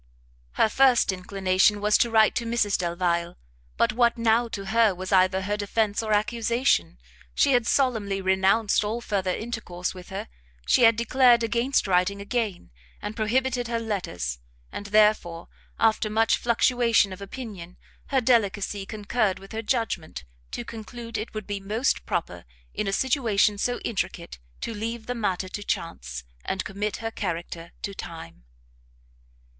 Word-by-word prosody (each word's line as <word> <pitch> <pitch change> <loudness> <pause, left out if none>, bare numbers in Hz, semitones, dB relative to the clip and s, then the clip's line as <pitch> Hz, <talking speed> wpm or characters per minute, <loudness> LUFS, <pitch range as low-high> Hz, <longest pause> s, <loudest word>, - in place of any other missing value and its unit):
Her - - +3
first 250 -1 +4
inclination 190 +2 +1
was 210 +1 +2
to 235 - +3
write 220 -1 +4
to 235 - -2
Mrs 230 -4 +1
Delvile, 170 0 -1 0.4
but 230 - +2
what 235 0 +3
now, 230 +1 +2
to 200 -3 -6
her, 220 -1 +3
was 185 +1 -6
either 190 0 +3
her 205 +2 -1
defence 210 +1 0
or 220 -1 -3
accusation? 220 - +1 0.4
She - - +4
had 245 -3 +3
solemnly 220 -8 +1
renounced 190 +3 +2
all 215 +3 -2
further 200 -5 -2
intercourse 185 -4 -4
with 180 -1 -11
her, 190 - -5 0.4
she 245 - +5
had 225 0 +6
declared 235 +1 +4
against 235 +4 +1
writing 190 +1 +1
again, 205 - -3 0.3
and 210 +1 -6
prohibited 245 +2 0
her 235 0 -1
letters: 175 - -3 0.3
and, 205 - -6
therefore, 205 -5 +2 0.3
after 220 -1 +2
much 225 +1 +3
fluctuation 235 -3 +2
of 185 - -11
opinion, 200 -5 -8 0.3
her 265 -2 +1
delicacy 205 -4 +1
concurred 210 -1 -1
with 195 0 -13
her 220 0 -3
judgment, 225 - -2 0.3
to 65 - -5
conclude 230 +1 -8
it 215 +1 -4
would 215 -2 -4
be 205 -1 -4
most 215 +7 -1
proper, 90 - -3 0.3
in 210 - -2
a - - 0
situation 225 -4 +2
so 245 +3 0
intricate, 175 - -4 0.2
to 230 - -3
leave 225 +1 -4
the 245 - -2
matter 195 -5 -2
to 205 - -6
chance, 60 - -4 0.2
and 190 - -3
commit 200 +1 -3
her 225 - -1
character 170 -4 -5
to 200 - -3
time. 85 - -9
210 Hz, 155 wpm, -25 LUFS, 190-230 Hz, 0.4 s, had